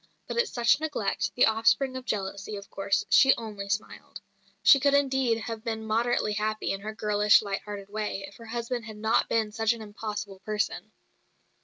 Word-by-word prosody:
But -, -, -5 dB
at 475 Hz, 0 st, +3 dB
such 240 Hz, +3 st, +3 dB
neglect, 285 Hz, -11 st, -1 dB
the 250 Hz, -, +5 dB
offspring 230 Hz, +4 st, +2 dB
of 260 Hz, -1 st, -6 dB
jealousy, 200 Hz, 0 st, -3 dB
of 200 Hz, 0 st, -10 dB
course, 195 Hz, 0 st, 0 dB
she 270 Hz, 0 st, +6 dB
only 210 Hz, -3 st, -7 dB
smiled. 205 Hz, +2 st, -4 dB, 0.4 s
She 275 Hz, -, +8 dB
could 280 Hz, +1 st, +3 dB
indeed 265 Hz, -4 st, +2 dB
have 225 Hz, -1 st, -6 dB
been 220 Hz, -1 st, -3 dB
moderately 220 Hz, -1 st, +1 dB
happy 215 Hz, +1 st, -1 dB
in 195 Hz, -, -4 dB
her 215 Hz, +1 st, -6 dB
girlish, 210 Hz, 0 st, +4 dB
light 200 Hz, -1 st, -3 dB
hearted 205 Hz, -1 st, -7 dB
way, 210 Hz, -1 st, -4 dB
if 200 Hz, -, -15 dB
her 230 Hz, -, -12 dB
husband 235 Hz, +1 st, -3 dB
had 220 Hz, -2 st, -9 dB
not 220 Hz, +2 st, +1 dB
been 220 Hz, -2 st, +1 dB
such 225 Hz, +2 st, +1 dB
an 230 Hz, -, -9 dB
impossible 210 Hz, -2 st, -6 dB
person. 210 Hz, +2 st, -3 dB
215 Hz, 185 wpm, -27 LUFS, 205-235 Hz, 0.4 s, She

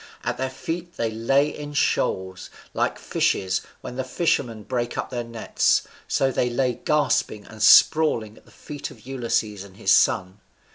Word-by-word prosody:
At -, -, -2 dB
their 130 Hz, 0 st, -1 dB
feet 170 Hz, +6 st, -6 dB
they 115 Hz, -1 st, -1 dB
lay 135 Hz, +6 st, +2 dB
in 145 Hz, 0 st, -7 dB
shoals: 95 Hz, -8 st, 0 dB, 0.2 s
like -, -, 0 dB
fishes, 95 Hz, -1 st, 0 dB, 0.2 s
when 125 Hz, -, -8 dB
the 130 Hz, -, -1 dB
fishermen 130 Hz, -6 st, -1 dB
break 120 Hz, +1 st, -3 dB
up -, -, -3 dB
their 120 Hz, -1 st, -3 dB
nets, 115 Hz, -1 st, +1 dB, 0.2 s
so 135 Hz, 0 st, +1 dB
they 125 Hz, -1 st, 0 dB
lay 125 Hz, +1 st, 0 dB
gasping 145 Hz, -8 st, +1 dB
and 110 Hz, -1 st, -12 dB
sprawling 115 Hz, -4 st, +5 dB
at -, -, -20 dB
the -, -, -20 dB
feet 145 Hz, -1 st, -8 dB
of -, -, -16 dB
Ulysses 115 Hz, -6 st, -2 dB
and 95 Hz, -1 st, -15 dB
his -, -, +1 dB
son. 95 Hz, +2 st, +3 dB
120 Hz, 170 wpm, -24 LUFS, 110-135 Hz, 0.2 s, sprawling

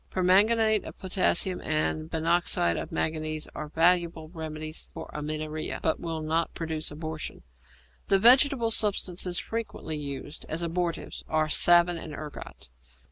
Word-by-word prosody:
Permanganate 215 Hz, +4 st, +3 dB
of -, -, -10 dB
potassium 185 Hz, -1 st, +1 dB
and 155 Hz, 0 st, -1 dB
binoxide 165 Hz, -, +1 dB
of -, -, -5 dB
manganese 155 Hz, -1 st, -2 dB
are 155 Hz, -, -6 dB
valuable 165 Hz, 0 st, +2 dB
remedies 155 Hz, -2 st, -6 dB
for -, -, -8 dB
amenorrhoea, 155 Hz, +1 st, -4 dB
but 160 Hz, -, +1 dB
will 165 Hz, -2 st, -4 dB
not 160 Hz, +2 st, -1 dB
produce 160 Hz, -1 st, -2 dB
abortion. 155 Hz, +1 st, -6 dB, 0.6 s
The 195 Hz, -, +4 dB
vegetable 245 Hz, +2 st, +5 dB
substances 185 Hz, -4 st, +1 dB
frequently 225 Hz, -8 st, -4 dB
used 145 Hz, 0 st, -6 dB
as 165 Hz, +2 st, -1 dB
abortives 170 Hz, 0 st, -3 dB
are 155 Hz, -1 st, +1 dB
savin 175 Hz, +2 st, +5 dB
and 155 Hz, -2 st, -8 dB
ergot. 150 Hz, -, -9 dB
165 Hz, 130 wpm, -27 LUFS, 155-180 Hz, 0.6 s, vegetable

